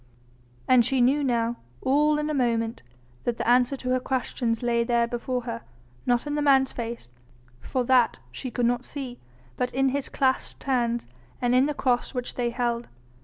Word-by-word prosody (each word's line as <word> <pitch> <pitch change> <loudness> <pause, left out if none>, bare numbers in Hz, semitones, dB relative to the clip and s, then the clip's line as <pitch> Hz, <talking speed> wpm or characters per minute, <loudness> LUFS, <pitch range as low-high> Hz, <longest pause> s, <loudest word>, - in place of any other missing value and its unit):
And 255 -2 +6
she 265 +3 +1
knew 270 +4 +3
now 235 -2 0 0.2
all 295 - +3
in 300 0 -1
a 305 - -1
moment 230 -4 0 0.4
that 240 -1 -1
the - - -3
answer 250 +3 +4
to 255 - -4
her 255 - +3
questions 245 -3 -1
lay 235 -1 +2
there 235 0 +2
before 245 +1 -2
her, 230 -1 -5 0.5
not 245 +1 +2
in 295 - -3
the 295 - 0
man's 270 -2 +4
face, 235 - -6 0.5
for 255 - -2
that 245 -1 +3
she 260 - -5
could 245 0 0
not 245 +1 +1
see, 260 -4 -6 0.4
but 250 - -1
in 270 0 +3
his 275 +1 -2
clasped 265 -2 0
hands 240 -3 0 0.3
and 245 0 +1
in 255 +2 +5
the 300 - -2
cross 250 -1 0
which 250 -1 -3
they 240 -1 -1
held. 235 0 -1
250 Hz, 185 wpm, -26 LUFS, 235-265 Hz, 0.5 s, And